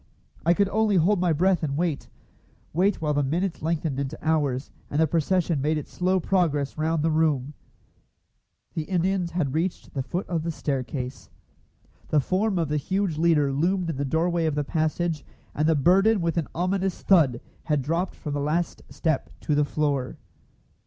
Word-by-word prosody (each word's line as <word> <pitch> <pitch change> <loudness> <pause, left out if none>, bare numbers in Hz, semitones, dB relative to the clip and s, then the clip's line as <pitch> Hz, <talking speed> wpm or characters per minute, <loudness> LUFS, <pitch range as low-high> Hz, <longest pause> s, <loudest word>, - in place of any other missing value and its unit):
I 170 +2 +4
could 200 +1 +3
only 215 0 +2
hold 185 +3 +3
my 180 -1 +2
breath 180 +3 +2
and 145 -3 -2
wait 165 -3 -1 0.6
wait 185 +2 +1
while 150 -1 +1
the 145 - +2
minutes 165 +7 -1
lengthened 160 -3 -1
into 140 +2 -3
hours, 145 -4 0 0.2
and 145 - -1
the 160 - +5
procession 165 0 +1
made 155 +3 +1
its 150 - -6
slow 185 +1 +1
progress 160 -7 0
round 155 0 0
the 165 - +2
room. 150 -3 +1 1.2
The 160 - -3
Indians 185 0 0
had 150 -7 -1
reached 170 +4 -2
the 135 - -1
foot 175 +8 -4
of 170 -3 -1
the 165 - -3
staircase. 135 -4 -4 0.8
The 155 - +3
form 190 +7 0
of 165 -3 0
the 150 - +1
huge 185 +1 -1
leader 155 -4 +3
loomed 175 +4 +1
in 135 - -6
the 140 - -1
doorway 165 +3 +1
of 155 - -1
the 150 - 0
passage, 155 +1 -1 0.3
and 155 +2 +1
the 160 - +4
burden 195 +9 +4
with 170 -1 0
an 165 -4 0
ominous 185 +1 -1
thud 150 -11 +4 0.3
had 150 -4 +1
dropped 165 +6 -1
from 150 - -5
the 145 - -1
last 160 +4 -1
step 155 -4 -1
to 150 - 0
the 145 0 +3
floor. 145 -3 -1
160 Hz, 180 wpm, -25 LUFS, 145-180 Hz, 1.2 s, the